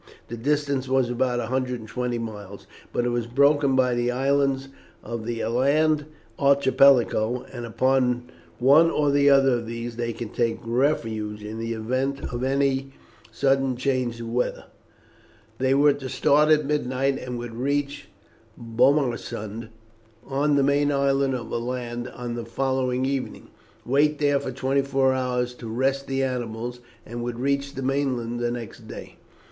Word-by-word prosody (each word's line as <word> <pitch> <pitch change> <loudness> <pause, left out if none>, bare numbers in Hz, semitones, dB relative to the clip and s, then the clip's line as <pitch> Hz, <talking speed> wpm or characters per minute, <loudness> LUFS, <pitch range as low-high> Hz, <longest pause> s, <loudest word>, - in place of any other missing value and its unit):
The 120 - -4
distance 140 +1 0
was 130 -2 +2
about 125 0 0
120 125 0 -2
miles; 105 -4 -7 0.3
but 120 - 0
it - - +1
was 120 -1 -1
broken 140 +2 +3
by 125 -1 +3
the 120 0 0
islands 135 +1 +1 0.3
of 115 0 -5
the 115 -1 -2
Aland 145 +6 +2 0.3
Archipelago, 135 -4 +4
and 120 -2 -6
upon 125 +1 +1 0.3
one 145 +7 +6
or 150 -3 +1
other 140 -1 +5
of 115 -1 -6
these 115 0 -5
they 120 -1 -2
could 115 -1 -7
take 115 -2 0
refuge 115 -4 -1
in 110 +1 -6
the 115 0 -3
event 130 +5 -2
of 120 +1 -3
any 135 0 0 0.4
sudden 135 +1 +1
change 130 -3 -1
of 115 -1 -6
weather. 125 +1 -1 0.9
They 130 +1 +2
were 145 +1 +5
to 135 -2 -7
start 150 +4 +3
at 155 -1 +4
midnight, 135 -2 0
and 125 -1 -5
would 120 -1 -6
reach 140 +4 -2 0.5
Bomarsund, 115 -3 0 0.6
on 140 +2 +1
the 140 - +3
main 145 +1 +2
island 140 -1 +1
of 120 -3 -6
Aland, 120 0 -3
on 120 -1 -6
the 120 -1 -5
following 130 +1 -1
evening, 135 -1 -4 0.4
wait 145 +4 +2
there 145 -1 +2
for 130 - -5
twenty 135 +2 0
four 135 -1 +2
hours 125 -1 -1
to 120 -2 -9
rest 135 +4 -1
the 135 0 0
animals, 120 -1 -3 0.3
and 120 +1 -6
would 120 0 -4
reach 140 +1 -1
the 135 - -4
mainland 130 -3 -1
the 120 0 0
next 120 -2 -7
day. - - -10
130 Hz, 150 wpm, -24 LUFS, 120-140 Hz, 0.9 s, one